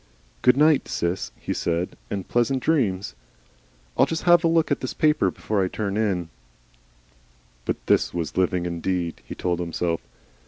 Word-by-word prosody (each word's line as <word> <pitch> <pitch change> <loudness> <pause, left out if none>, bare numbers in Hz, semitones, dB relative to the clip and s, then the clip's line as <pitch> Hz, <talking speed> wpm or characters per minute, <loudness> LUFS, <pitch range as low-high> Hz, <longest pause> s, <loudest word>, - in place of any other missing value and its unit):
"Good 125 +1 +5
night, 150 0 +4
Sis," 85 -7 -2
he - - -3
said, 85 +1 -1 0.2
"and 95 -2 -4
pleasant 125 +2 +1
dreams. 110 - +1 0.8
I'll - - +4
just 165 +2 -3
'ave 175 -1 +7
a 165 - +4
look 165 -2 +2
at 140 - +2
this 130 - -4
paper 155 0 +3
before 105 -3 -1
I - - +1
turn 100 +1 -3
in." 95 -6 0 1.4
But - - -1
this - - +3
was 85 -3 -4
living 90 -1 +1
indeed! 85 0 -2
he - - -6
told 90 -1 -1
himself. 85 -1 -1
95 Hz, 160 wpm, -24 LUFS, 85-140 Hz, 1.4 s, ave